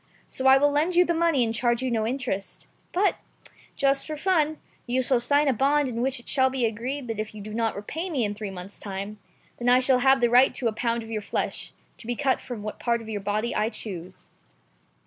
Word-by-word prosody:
So 265 Hz, -, 0 dB
I 265 Hz, 0 st, +8 dB
will 290 Hz, +1 st, +3 dB
lend 310 Hz, +5 st, +1 dB
you 355 Hz, +1 st, +6 dB
the 340 Hz, -, +1 dB
money 330 Hz, -6 st, +2 dB
and 225 Hz, -1 st, -1 dB
charge 240 Hz, +2 st, 0 dB
you 255 Hz, -, -1 dB
no 220 Hz, -2 st, 0 dB
interest. 245 Hz, -6 st, -4 dB, 0.3 s
But, 390 Hz, +3 st, +2 dB, 0.6 s
just 275 Hz, -1 st, +1 dB
for 310 Hz, -1 st, -4 dB
fun, 315 Hz, -3 st, +1 dB, 0.3 s
you 255 Hz, +2 st, +1 dB
shall 250 Hz, 0 st, +3 dB
sign 285 Hz, +5 st, +2 dB
a 270 Hz, -, +4 dB
bond 280 Hz, +4 st, +2 dB
in 235 Hz, -2 st, -3 dB
which 265 Hz, 0 st, +1 dB
it 240 Hz, -, -14 dB
shall 260 Hz, -2 st, +3 dB
be 260 Hz, -2 st, 0 dB
agreed 245 Hz, +5 st, -3 dB
that 225 Hz, -2 st, -4 dB
if 215 Hz, 0 st, -5 dB
you -, -, -8 dB
do 215 Hz, +1 st, -8 dB
not 225 Hz, 0 st, 0 dB
repay 320 Hz, -, -4 dB
me 270 Hz, -9 st, +1 dB
in 205 Hz, -, -2 dB
three 210 Hz, -1 st, -6 dB
months' 190 Hz, +1 st, -8 dB
time, 200 Hz, +1 st, -6 dB, 0.4 s
then 245 Hz, 0 st, +1 dB
I 250 Hz, +1 st, +6 dB
shall 255 Hz, 0 st, +4 dB
have 265 Hz, +1 st, +4 dB
the 240 Hz, -1 st, +2 dB
right 250 Hz, +2 st, +5 dB
to 250 Hz, -, -1 dB
a 225 Hz, -, 0 dB
pound 230 Hz, +1 st, -1 dB
of 225 Hz, -, -10 dB
your 215 Hz, -1 st, -2 dB
flesh, 205 Hz, -, -3 dB, 0.3 s
to 225 Hz, -, -8 dB
be 240 Hz, -, -1 dB
cut 270 Hz, 0 st, +1 dB
from 235 Hz, -5 st, -7 dB
what 215 Hz, -, -6 dB
part 235 Hz, -1 st, 0 dB
of 220 Hz, -, -10 dB
your 210 Hz, -2 st, -3 dB
body 210 Hz, +4 st, -1 dB
I 215 Hz, +1 st, +1 dB
choose." 185 Hz, -5 st, -7 dB
245 Hz, 245 wpm, -25 LUFS, 220-275 Hz, 0.6 s, I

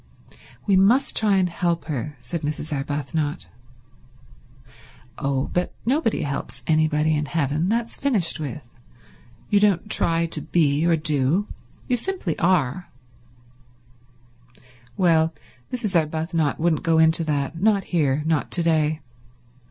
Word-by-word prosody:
"We 200 Hz, -, +3 dB
must 225 Hz, +9 st, +3 dB
try 210 Hz, -3 st, +3 dB
and 185 Hz, -1 st, +2 dB
help 170 Hz, -1 st, -1 dB
her," 150 Hz, -1 st, -4 dB
said 125 Hz, +7 st, -5 dB
Mrs. 150 Hz, +1 st, -4 dB
Arbuthnot. 145 Hz, -, -3 dB, 1.7 s
"Oh, 135 Hz, -1 st, -1 dB
but 180 Hz, 0 st, -1 dB
nobody 250 Hz, -, +1 dB
helps 135 Hz, -4 st, -5 dB
anybody 155 Hz, 0 st, +2 dB
in 150 Hz, 0 st, -2 dB
heaven. 155 Hz, +2 st, 0 dB
That's 230 Hz, +1 st, -1 dB
finished 220 Hz, -, 0 dB
with. 145 Hz, -3 st, -6 dB, 0.8 s
You 205 Hz, -, +5 dB
don't 205 Hz, 0 st, +1 dB
try 165 Hz, 0 st, +2 dB
to 160 Hz, -2 st, -5 dB
be, 155 Hz, 0 st, +1 dB
or 170 Hz, -, +4 dB
do. 155 Hz, +4 st, +2 dB, 0.4 s
You 250 Hz, -, +1 dB
simply 300 Hz, -, -3 dB
are." 175 Hz, -2 st, +1 dB, 2.1 s
Well, 165 Hz, -4 st, +3 dB, 0.4 s
Mrs. 230 Hz, -7 st, -3 dB
Arbuthnot 160 Hz, -1 st, 0 dB
wouldn't 160 Hz, -2 st, +1 dB
go 165 Hz, -1 st, +2 dB
into 160 Hz, +1 st, +4 dB
that—not 165 Hz, +8 st, 0 dB
here, 150 Hz, -5 st, 0 dB
not 160 Hz, -1 st, 0 dB
to 175 Hz, -, +3 dB
day. 155 Hz, -1 st, +1 dB
160 Hz, 120 wpm, -23 LUFS, 150-185 Hz, 2.1 s, You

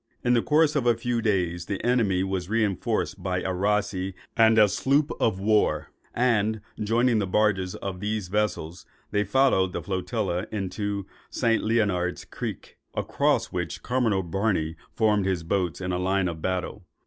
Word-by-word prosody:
In 125 Hz, -, +3 dB
the 120 Hz, -, +4 dB
course 155 Hz, +2 st, +3 dB
of 130 Hz, -4 st, +1 dB
a 120 Hz, -2 st, +4 dB
few 120 Hz, 0 st, -1 dB
days, 90 Hz, -5 st, 0 dB
the 100 Hz, -2 st, -3 dB
enemy 110 Hz, -7 st, +2 dB
was 95 Hz, -1 st, -3 dB
reinforced 110 Hz, -2 st, 0 dB
by 90 Hz, 0 st, -1 dB
a 95 Hz, -, -2 dB
rasee 95 Hz, -1 st, 0 dB, 0.2 s
and 110 Hz, -1 st, +5 dB
a 105 Hz, -1 st, +7 dB
sloop 140 Hz, +8 st, +1 dB
of 105 Hz, -4 st, +1 dB
war; 95 Hz, -8 st, +1 dB, 0.2 s
and 110 Hz, -3 st, +2 dB, 0.2 s
joining 115 Hz, +2 st, +2 dB
the 100 Hz, -, -1 dB
barges 95 Hz, -2 st, +1 dB
of 95 Hz, -2 st, -5 dB
these 105 Hz, -1 st, -2 dB
vessels, 90 Hz, -4 st, -2 dB, 0.2 s
they 105 Hz, -, +2 dB
followed 105 Hz, -5 st, +2 dB
the -, -, -3 dB
flotilla 95 Hz, -1 st, -2 dB
into 100 Hz, 0 st, -3 dB, 0.2 s
St. 115 Hz, -1 st, +1 dB
Leonard's 100 Hz, -5 st, 0 dB
Creek, -, -, -7 dB, 0.2 s
across -, -, +1 dB
which 90 Hz, -2 st, -4 dB
Commodore 115 Hz, -6 st, +1 dB
Barney 85 Hz, -3 st, -1 dB, 0.2 s
formed 105 Hz, -3 st, +2 dB
his 90 Hz, -3 st, -1 dB
boats 90 Hz, -1 st, -1 dB
in 90 Hz, -1 st, -3 dB
line 90 Hz, +1 st, +1 dB
of 80 Hz, -2 st, -5 dB
battle. 95 Hz, +2 st, -3 dB
100 Hz, 160 wpm, -26 LUFS, 90-110 Hz, 0.2 s, a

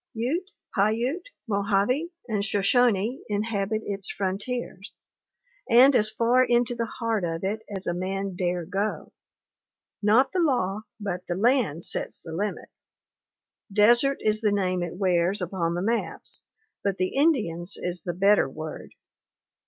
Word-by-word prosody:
"Ute, 305 Hz, -, -2 dB, 0.3 s
Paiute, 235 Hz, -, 0 dB, 0.2 s
Mojave, 205 Hz, +9 st, +1 dB, 0.2 s
and 210 Hz, -4 st, -1 dB
Shoshone 215 Hz, +3 st, +2 dB
inhabit 210 Hz, 0 st, -1 dB
its 195 Hz, -1 st, -3 dB
frontiers, 200 Hz, +1 st, -4 dB, 0.7 s
and 255 Hz, +3 st, +7 dB
as 215 Hz, -2 st, +4 dB
far 235 Hz, +3 st, +3 dB
into 245 Hz, 0 st, +2 dB
the 235 Hz, -1 st, -2 dB
heart 225 Hz, -4 st, -2 dB
of 165 Hz, 0 st, -3 dB
it 210 Hz, +3 st, -2 dB
as 195 Hz, -2 st, -3 dB
a 175 Hz, -, 0 dB
man 190 Hz, +2 st, -3 dB
dare 175 Hz, -1 st, -1 dB
go. 200 Hz, +4 st, -3 dB, 0.9 s
Not 220 Hz, +6 st, +4 dB
the 370 Hz, -, -1 dB
law, 215 Hz, -, +1 dB, 0.2 s
but 180 Hz, -3 st, -4 dB
the 175 Hz, -, -2 dB
land 210 Hz, -, +1 dB
sets -, -, -2 dB
the 165 Hz, -, -10 dB
limit. 205 Hz, +5 st, -3 dB, 1.0 s
Desert 240 Hz, +7 st, +5 dB
is 215 Hz, 0 st, +1 dB
the 210 Hz, -2 st, +2 dB
name 185 Hz, -3 st, 0 dB
it 175 Hz, -1 st, -4 dB
wears 185 Hz, 0 st, +2 dB
upon 170 Hz, -2 st, -2 dB
the 175 Hz, -, -2 dB
maps, 230 Hz, +3 st, -3 dB, 0.4 s
but 195 Hz, -1 st, 0 dB
the 185 Hz, 0 st, -1 dB
Indian's 210 Hz, -, +1 dB
is 175 Hz, -1 st, -3 dB
the 175 Hz, +1 st, -4 dB
better 195 Hz, -4 st, +4 dB
word. 155 Hz, +3 st, -8 dB
205 Hz, 140 wpm, -26 LUFS, 185-235 Hz, 1.0 s, and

